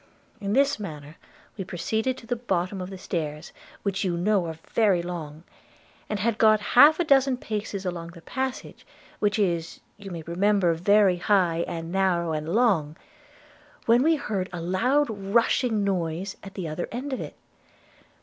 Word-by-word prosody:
In 200 0 -2
this 280 0 +3
manner 155 -5 -8 0.4
we 195 - -3
proceeded 220 +9 -2
to 235 - -12
the 245 +2 -1
bottom 190 -5 -2
of 180 - -5
the 190 - -8
stairs, 155 -3 -4 0.3
which 200 -1 -1
you 175 -3 -1
know 190 0 +1
are 160 -1 -6 0.2
very 200 -6 +3
long, 165 -3 -6 0.7
and 215 - -1
had 225 +2 0
got 215 -1 +6
half 295 +6 +8
a - - +3
dozen 270 -4 +3
paces 210 -4 -4
along 175 -2 -4
the 165 - -13
passage, 260 +4 -4 0.4
which 205 0 +1
is, 170 -5 -1 0.2
you 200 -1 -9
may 170 -3 -6
remember, 185 +1 +2
very 195 +2 +4
high 175 -3 +2
and 165 0 -5
narrow 180 -3 +1
and 155 +1 -3
long, 180 -8 +2 0.9
when 235 +2 +5
we 320 +4 +4
heard 205 -10 -3
a 175 - -5
loud 245 +13 +1
rushing 220 +1 +1
noise 185 -1 -2
at 195 -1 -11
the 185 -4 -4
other 155 +3 -4
end 265 +4 -4
of 260 - -3
it. - - -7
195 Hz, 170 wpm, -26 LUFS, 170-225 Hz, 0.9 s, half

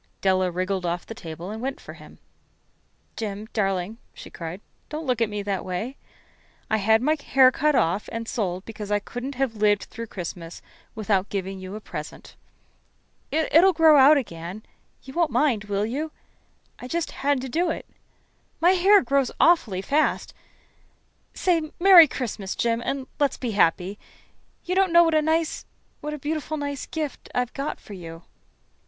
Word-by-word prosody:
Della 185 -1 +2
wriggled 185 +1 -2
off 175 0 -2
the - - -7
table 175 -3 -8
and 220 +1 -6
went 270 +2 -3
for - - -10
him. - - -15 1.0
"Jim, 210 -1 -5
darling," 195 +1 -1 0.2
she - - -11
cried, 170 +2 -7 0.3
"don't 310 +1 -5
look 250 -3 0
at 225 - +2
me 210 -1 -4
that 200 -2 -2
way. 190 +9 -4 0.8
I 220 - +3
had 220 +3 +3
my 305 +3 +3
hair 260 -1 +5
cut 300 +2 +1
off 180 0 +1
and 230 0 -5
sold 185 -6 -2
it - - -39
because 210 -2 -7
I 205 - +2
couldn't 245 +6 -6 0.2
live 210 -1 +2
through 230 0 -8
Christmas 175 -3 -7 0.3
without 205 -3 0
giving 195 -1 -4
you 185 +2 -7
a - - -5
present. - - -9 0.9
It'll 330 +4 +4
grow 320 -1 +6
out 285 +2 +7
again 180 -4 -5 0.4
you 265 - -11
won't 335 0 +2
mind, 245 -10 +1
will 205 0 -1
you? 290 +8 -3 0.7
I 250 - -7
just 335 +4 -2
had 280 0 0
to 265 - -5
do 335 +7 0
it. 320 - -4 0.7
My 350 +2 +5
hair 385 +1 +5
grows 270 0 +1
awfully 220 - +3
fast. 295 +8 0 1.0
Say 330 -4 +1
'Merry 355 -3 +9
Christmas,' 215 -7 -4
Jim, 230 0 0
and 270 +1 -3
let's 285 -2 +1
be 245 -3 -3
happy. 190 0 +1 0.7
You 360 - -1
don't 380 -1 +3
know 340 0 +7
what 330 -1 +1
a 310 - +4
nice 320 +1 -1 0.3
what 300 0 -4
a - - -7
beautiful, 310 +2 -3
nice 285 -2 -4
gift 305 -4 -5
I've 250 -1 -1
got 280 +2 -4
for 210 - -12
you." 165 -3 -9
230 Hz, 170 wpm, -24 LUFS, 195-300 Hz, 1.0 s, Merry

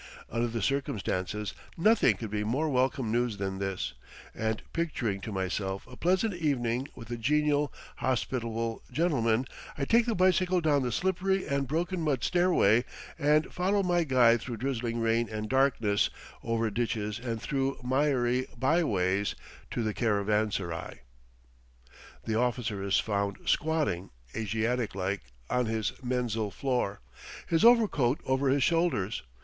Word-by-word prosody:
Under 115 +1 0
the 115 -2 -3
circumstances 105 -6 -1 0.2
nothing 170 - +4
could 110 -3 -6
be 105 0 -1
more 130 +9 0
welcome 130 -3 +1
news 120 -2 0
than 95 -1 -3
this; 95 -9 -3 0.4
and 110 0 -2
picturing 120 -12 -1
to 110 - -5
myself 95 0 -2
a 125 - -12
pleasant 190 - +1
evening 135 -6 0
with 115 -1 -10
a 120 - -2
genial, 145 +2 +2 0.3
hospitable 115 -2 -1
gentleman, 130 -8 +1 0.3
I 140 - -1
take 230 - +3
the 230 - +1
bicycle 185 0 +3
down 150 -4 +2
the 125 -1 -1
slippery 190 +5 0
and 140 -1 -1
broken 170 +5 -1
mud 145 -6 0
stairway, 175 - +4 0.4
and 150 +1 +2
follow 195 +3 +1
my 175 -2 +2
guide 120 -5 +4
through 120 -1 -5
drizzling 120 -1 -2
rain 115 0 +1
and 110 0 -4
darkness, 125 -5 +2 0.3
over 115 -1 0
ditches 110 -1 -2
and 115 -2 -3
through 135 +2 -1
miry 130 -1 +1
byways, 105 - +1 0.3
to 120 - -2
the 110 -1 -1
caravanserai. 105 - -1 1.2
The 110 0 0
officer 120 -4 -1
is 100 0 +2
found 100 -1 -1
squatting, 150 - 0 0.3
Asiatic 115 +1 -1
like, 95 0 -2 0.3
on 125 - +1
his 110 -2 -1
menzil 120 -4 -1
floor, 125 - -1 0.4
his 165 +3 +1
overcoat 205 - +4
over 130 +1 +1
his 135 0 +3
shoulders. 165 - +1
120 Hz, 140 wpm, -29 LUFS, 110-145 Hz, 1.2 s, nothing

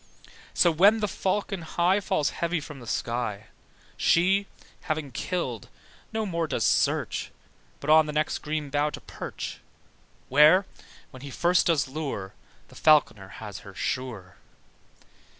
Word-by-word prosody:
So 175 - +5
when 200 +7 +5
the 210 - 0
falcon 195 0 -2
high 175 +4 +1
Falls 155 -6 0
heavy 170 0 -1
from 145 -1 -9
the 120 - -12
sky, 115 -3 -3 0.5
She, 190 +4 +3 0.4
having 155 -3 -2
killed, 125 - -3 0.4
no 220 -1 -1
more 170 -4 -1
does - - -1
search - - +1 0.5
But 150 - 0
on 155 0 +6
the - - -3
next 150 0 -1
green 150 -2 -4
bough 145 +1 +1
to - - -8
perch, - - -7 0.7
Where, 155 +8 +6 0.5
when 130 -2 -12
he 140 - -8
first 175 +6 +2
does 160 -5 +2
lure, 130 -9 -5 0.4
The - - -16
falc'ner 110 -11 +3
has 105 -4 -8
her 100 -1 -13
sure. 110 -4 -4
155 Hz, 140 wpm, -26 LUFS, 130-175 Hz, 0.7 s, on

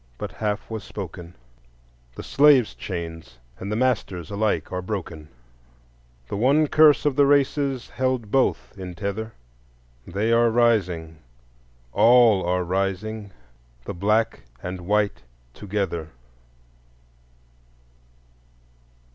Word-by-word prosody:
But - - -5
half 105 -1 -3
was 110 -3 -6
spoken; 90 -3 -8 0.8
The - - -7
slave's 140 -5 +4
chains 80 -8 -7 0.2
and 100 +2 -5
the - - 0
master's 105 -8 -1
Alike 105 +1 -1
are 90 - -3
broken; 90 -6 -6 1.0
The - - -5
one 140 +8 +3
curse 150 0 +5
of 145 -3 +2
the 140 0 +4
races 140 -2 +1
Held 130 -4 -1
both 135 -1 +1
in 90 -2 -8
tether; 105 +4 -4 0.7
They 100 +5 -1
are 115 0 +4
rising—all 80 - +1
are 90 +1 0
rising— 100 +3 -3 0.5
The - - -5
black 105 +5 +1 0.2
and 90 0 -5
white 105 0 +1 0.3
together. 95 -5 -3
100 Hz, 105 wpm, -24 LUFS, 90-120 Hz, 1.0 s, curse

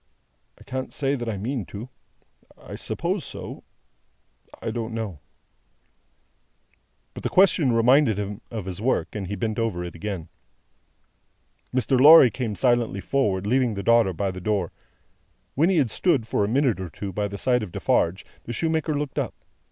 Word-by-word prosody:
"I - - -16
can't 130 0 -5
say 135 -1 -1
that 120 -4 -3
I 105 - -3
mean 120 +4 -3
to. 105 +8 -8 0.7
I - - -11
suppose - - -2
so. - - -8 1.0
I - - -3
don't 115 -1 -4
know." 105 -9 -4 1.9
But, - - -8
the - - -2
question 180 -8 +4
reminded 120 0 +4
him 105 0 -4
of 110 -5 -5
his 95 +1 -6
work, 130 +3 0
and 100 -3 -4
he 100 - -3
bent 110 +3 -2
over 105 -6 -1
it 85 -2 -6
again. 85 -2 -5 1.4
Mr. 130 0 +1
Lorry 145 -4 +9
came 115 -5 -3
silently 120 -5 +1
forward, 100 -3 0
leaving 125 0 +1
the 100 - -4
daughter 115 -2 +4
by 95 +2 -2
the 95 0 -8
door. 100 -3 -1 0.8
When 160 +6 +3
he 190 - +2
had 130 -8 +2
stood, 150 -8 +2
for 110 - 0
a - - +1
minute 125 -2 +1
or 95 -2 -5
two, 95 +4 -7
by 105 +2 -1
the 100 0 -7
side 125 +4 +2
of 105 -5 -6
Defarge, 85 +2 0 0.2
the 120 - -5
shoemaker 160 +1 0
looked 145 -1 -3
up. - - -3
115 Hz, 170 wpm, -24 LUFS, 100-130 Hz, 1.9 s, Lorry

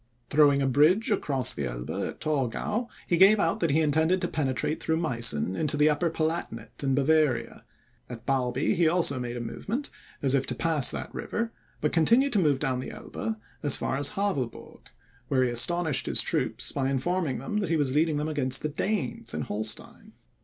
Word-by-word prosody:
Throwing 145 -2 +4
a - - +1
bridge 155 - +3
across 140 -10 +2
the 70 - -3
Elbe - - -5 0.2
at - - -10
Torgau, 155 - -2 0.2
he 175 - +1
gave 200 +4 +6
out 165 -3 +1
that 165 - +1
he 155 +3 +2
intended 160 +4 +2
to 175 - 0
penetrate 145 0 -2
through 160 - 0
Meissen 115 - +1
into 150 +3 0
the 150 +1 +4
Upper 150 +3 0
Palatinate 155 -9 -3
in 135 -1 +1
Bavaria; 140 -4 +1 0.5
at 120 -2 -9
Barby 130 -1 0
he 170 -4 +2
also 160 -5 +2
made 120 -1 -4
a - - -4
movement, 200 - -5 0.3
as 135 -1 +3
if 135 -1 +1
to - - -2
pass 160 -6 +3
that - - -3
river, 230 +1 -3 0.3
but 150 - +1
continued 235 - +3
to 210 - +3
move 150 -6 +2
down 130 -2 -1
the 130 - -5
Elbe 220 0 -5 0.2
as 145 -3 +3
far - - -2
as 140 +1 +1
Havelburg, 145 - -3 0.4
where 130 -2 +2
he 125 - 0
astonished 160 +4 +2
his - - +2
troops - - -1
by 135 -1 -1
informing 150 +2 -1
them 215 -3 -4
that 200 -5 -1
he 165 - +2
was 140 -4 +1
leading 155 0 +2
them 150 +1 -2
against 135 -4 0
the 155 - -1
Danes 165 - -3
in - - -2
Holstein. 110 +1 -4
150 Hz, 195 wpm, -27 LUFS, 130-170 Hz, 0.5 s, gave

